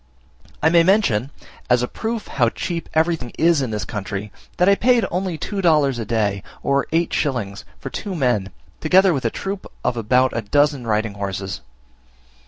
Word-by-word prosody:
I 160 Hz, -, +6 dB
may 170 Hz, 0 st, +6 dB
mention, 165 Hz, -, +2 dB, 0.4 s
as 125 Hz, 0 st, +4 dB
a -, -, 0 dB
proof 225 Hz, -, -4 dB
how 120 Hz, -4 st, +2 dB
cheap 170 Hz, +6 st, -4 dB
everything 160 Hz, -6 st, +1 dB
is 165 Hz, -2 st, +4 dB
in 130 Hz, -, -2 dB
this 105 Hz, -1 st, -3 dB
country, 105 Hz, -1 st, -5 dB, 0.3 s
that 180 Hz, -, +3 dB
I 200 Hz, -, +7 dB
paid 240 Hz, +3 st, +3 dB
only 180 Hz, -1 st, -2 dB
two 200 Hz, +4 st, -3 dB
dollars 150 Hz, -7 st, +3 dB
a 115 Hz, -, -3 dB
day, 105 Hz, -3 st, 0 dB, 0.2 s
or 140 Hz, 0 st, +1 dB
eight 165 Hz, +1 st, +1 dB
shillings, 110 Hz, -9 st, -2 dB
for 135 Hz, -, -7 dB
two 200 Hz, -3 st, -4 dB
men, 120 Hz, -, +1 dB, 0.3 s
together 185 Hz, +3 st, +4 dB
with 135 Hz, -3 st, -2 dB
a -, -, +3 dB
troop 195 Hz, 0 st, -5 dB
of 120 Hz, -, 0 dB
about 125 Hz, +4 st, +2 dB
a 115 Hz, -, 0 dB
dozen 145 Hz, +3 st, +1 dB
riding 110 Hz, -1 st, 0 dB
horses. 95 Hz, -2 st, -4 dB
135 Hz, 180 wpm, -21 LUFS, 110-170 Hz, 0.4 s, I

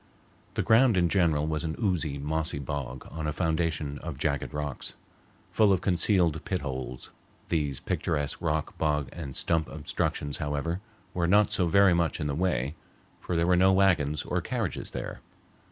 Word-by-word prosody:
The -, -, +1 dB
ground 115 Hz, -1 st, +5 dB
in 85 Hz, -1 st, +3 dB
general 80 Hz, -6 st, +2 dB
was 80 Hz, 0 st, -2 dB
an 80 Hz, -1 st, -2 dB
oozy, 85 Hz, -, 0 dB
mossy 80 Hz, +2 st, -2 dB
bog 70 Hz, -2 st, -5 dB
on 80 Hz, -1 st, -4 dB
a -, -, 0 dB
foundation 80 Hz, -3 st, -1 dB
of 80 Hz, -6 st, -6 dB
jagged 70 Hz, -1 st, -1 dB
rocks, 75 Hz, -2 st, -5 dB, 0.6 s
full 105 Hz, -2 st, +4 dB
of 95 Hz, -2 st, +2 dB
concealed 90 Hz, -3 st, +2 dB
pit 95 Hz, -2 st, -2 dB
holes. 65 Hz, -3 st, -5 dB, 0.4 s
These 75 Hz, -5 st, 0 dB
picturesque 75 Hz, 0 st, -2 dB
rock, 80 Hz, -2 st, -1 dB
bog, 75 Hz, -4 st, +1 dB
and 70 Hz, -6 st, -7 dB
stump 80 Hz, -2 st, +1 dB
obstructions, 70 Hz, -2 st, -2 dB
however, 75 Hz, +5 st, -2 dB, 0.3 s
were 85 Hz, -1 st, 0 dB
not 105 Hz, +3 st, +4 dB
so 90 Hz, -, +2 dB
very 100 Hz, +2 st, +5 dB
much 85 Hz, -1 st, +1 dB
in 75 Hz, -, -2 dB
the 70 Hz, -, -1 dB
way, 70 Hz, -5 st, 0 dB, 0.5 s
for 90 Hz, -, -3 dB
there 85 Hz, 0 st, +2 dB
were 90 Hz, +1 st, +4 dB
no 95 Hz, +2 st, +5 dB
wagons 80 Hz, -7 st, +3 dB
or -, -, -1 dB
carriages -, -, -3 dB
there. -, -, -6 dB
80 Hz, 170 wpm, -28 LUFS, 75-90 Hz, 0.6 s, ground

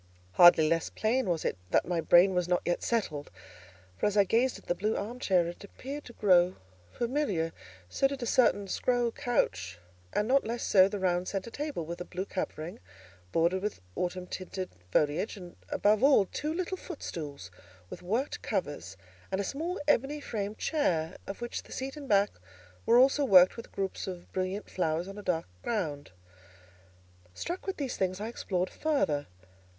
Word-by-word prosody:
Hardly 165 Hz, -, +7 dB
less 165 Hz, +1 st, +1 dB
plain 230 Hz, 0 st, 0 dB
was 165 Hz, -3 st, -1 dB
it -, -, 0 dB
that -, -, +3 dB
my 175 Hz, -2 st, 0 dB
brain 175 Hz, +4 st, +6 dB
was 180 Hz, -1 st, 0 dB
not 180 Hz, 0 st, +1 dB
yet 175 Hz, -, 0 dB
settled; 160 Hz, -11 st, -1 dB, 0.7 s
for, -, -, +2 dB
as 210 Hz, 0 st, -1 dB
I 200 Hz, -, +7 dB
gazed 235 Hz, +6 st, +2 dB
at -, -, -16 dB
the -, -, +1 dB
blue 210 Hz, +5 st, -1 dB
arm 235 Hz, +5 st, -5 dB
chair, 185 Hz, -7 st, +3 dB
it 170 Hz, +3 st, -7 dB
appeared 275 Hz, +8 st, -8 dB
to 240 Hz, -, -11 dB
grow 185 Hz, -4 st, +4 dB, 0.4 s
familiar; 235 Hz, -, -1 dB, 0.3 s
so 180 Hz, -, +2 dB
did 275 Hz, -2 st, -5 dB
a -, -, -1 dB
certain 220 Hz, -4 st, +3 dB
scroll 245 Hz, +3 st, +1 dB
couch, 90 Hz, -, -1 dB, 0.3 s
and 210 Hz, -, 0 dB
not 270 Hz, +2 st, +4 dB
less 235 Hz, +2 st, -3 dB
so 190 Hz, -2 st, +6 dB
the 205 Hz, +1 st, -4 dB
round 180 Hz, -1 st, 0 dB
centre 195 Hz, +3 st, -3 dB
table, 290 Hz, -, -4 dB
with 170 Hz, +2 st, -6 dB
a -, -, -4 dB
blue 185 Hz, +1 st, -4 dB
covering, 175 Hz, -4 st, -5 dB, 0.5 s
bordered 170 Hz, +3 st, +2 dB
with 210 Hz, +1 st, -3 dB, 0.2 s
autumn 180 Hz, 0 st, -2 dB
tinted 185 Hz, 0 st, -5 dB, 0.2 s
foliage; 150 Hz, -, +1 dB
and, 180 Hz, -2 st, -10 dB
above 210 Hz, +1 st, +3 dB
all, 275 Hz, -8 st, +6 dB
two 300 Hz, +10 st, -3 dB
little 370 Hz, +3 st, -2 dB
footstools 150 Hz, -, -7 dB, 0.4 s
with -, -, -8 dB
worked 225 Hz, +10 st, -2 dB
covers, 145 Hz, -, -3 dB, 0.3 s
and 190 Hz, -, 0 dB
a -, -, +1 dB
small 325 Hz, -, -3 dB
ebony 290 Hz, +1 st, +2 dB
framed 210 Hz, -6 st, -4 dB
chair, 175 Hz, -, 0 dB
of 195 Hz, +4 st, -6 dB
which 240 Hz, -, -4 dB
the -, -, -18 dB
seat 270 Hz, +2 st, -4 dB
and 285 Hz, -3 st, -9 dB
back 200 Hz, 0 st, +4 dB, 0.6 s
were 235 Hz, -, +6 dB
also 270 Hz, +3 st, +5 dB
worked 185 Hz, -8 st, +7 dB
with 230 Hz, -, -9 dB
groups 195 Hz, 0 st, -3 dB
of 180 Hz, -2 st, -7 dB
brilliant 185 Hz, +2 st, -2 dB
flowers 165 Hz, -1 st, -1 dB
on 195 Hz, +1 st, -8 dB
a -, -, -6 dB
dark 170 Hz, -4 st, -1 dB, 0.2 s
ground. 155 Hz, -11 st, -2 dB, 1.3 s
Struck 360 Hz, +3 st, -5 dB
with 385 Hz, -, -2 dB
these 275 Hz, -4 st, -3 dB
things, 185 Hz, 0 st, -1 dB
I 215 Hz, +2 st, -3 dB
explored 185 Hz, -5 st, -2 dB
further. 215 Hz, -, 0 dB
195 Hz, 180 wpm, -30 LUFS, 175-240 Hz, 1.3 s, Hardly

